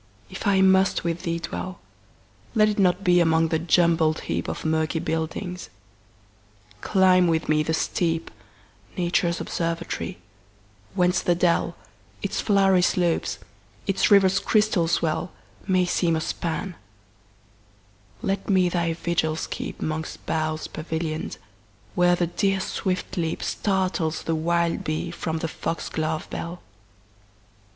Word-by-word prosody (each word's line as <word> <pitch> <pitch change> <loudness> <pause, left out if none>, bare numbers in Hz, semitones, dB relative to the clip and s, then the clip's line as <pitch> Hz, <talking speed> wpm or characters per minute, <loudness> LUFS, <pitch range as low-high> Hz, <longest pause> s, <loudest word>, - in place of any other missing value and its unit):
if 190 +3 -4
I 195 -1 +4
must 190 0 +4
with 170 0 -2
thee 170 0 -1
dwell, 180 +2 -5 0.8
Let 215 -1 +5
it 210 - -2
not 180 0 +3
be 180 -2 +5
among 165 -1 +3
the 160 - +1
jumbled 165 -2 +3
heapOf - - -3
murky 160 +1 +1
buildings; 165 +3 -3 1.1
climb 185 -2 +4
with 160 -1 +1
me 155 0 +3
the 160 +1 0
steep,—Nature's 165 - -2
observatory—whence 105 - -3
the 175 - +2
dell, 175 0 +1 0.5
Its - - -1
flowery 195 -3 +4
slopes, 175 - +1 0.5
its 195 -1 +2
river's 195 -1 +5
crystal 210 -4 +2
swell, 165 +1 0 0.4
May 185 -2 +3
seem 175 -1 +1
a 160 - -1
span; 170 +3 -3 1.5
let 195 +1 -2
me 185 -2 +4
thy 170 -1 0
vigils 160 -1 -1
keep'Mongst 155 0 -4
boughs 155 -1 -1
pavillion'd, 160 0 -4 0.6
where 175 0 +4
the 175 - +1
deer's 195 +2 0
swift 185 0 -3
leapStartles 175 0 -1
the 165 - -1
wild 170 +1 0
bee 155 0 -2
from 160 -1 -3
the 165 - -2
fox 165 +1 -4
glove 155 0 -2
bell. 170 +1 -5
170 Hz, 120 wpm, -24 LUFS, 160-185 Hz, 1.5 s, Let